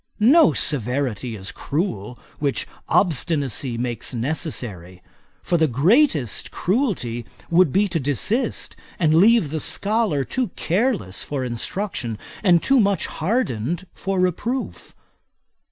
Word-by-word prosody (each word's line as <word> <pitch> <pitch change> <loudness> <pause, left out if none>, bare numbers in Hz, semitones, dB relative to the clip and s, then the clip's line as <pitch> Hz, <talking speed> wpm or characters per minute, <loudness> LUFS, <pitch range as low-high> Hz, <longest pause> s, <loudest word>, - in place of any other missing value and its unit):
No 255 - +6
severity 125 -4 0
is 95 -2 -6
cruel 125 - -3 0.2
which 140 -2 -1 0.2
obstinacy 145 - +1
makes 120 +1 -3
necessary; 115 - -4 0.4
for 175 - +1
the 160 - +4
greatest 150 - +2
cruelty 180 - -1 0.3
would 170 -3 +4
be 205 +6 +3
to 170 - -1
desist, 200 - -1 0.2
and 155 -3 +2
leave 195 -2 +5
the 160 - -2
scholar 205 -6 +1
too 255 - -2
careless 180 - 0
for 140 -3 -3
instruction, 125 - -3 0.3
and 175 -5 +4
too 270 -1 +4
much 200 -6 +2
hardened 165 - -2
for 195 -1 -2
reproof. 215 +8 -2
160 Hz, 115 wpm, -22 LUFS, 125-200 Hz, 0.4 s, No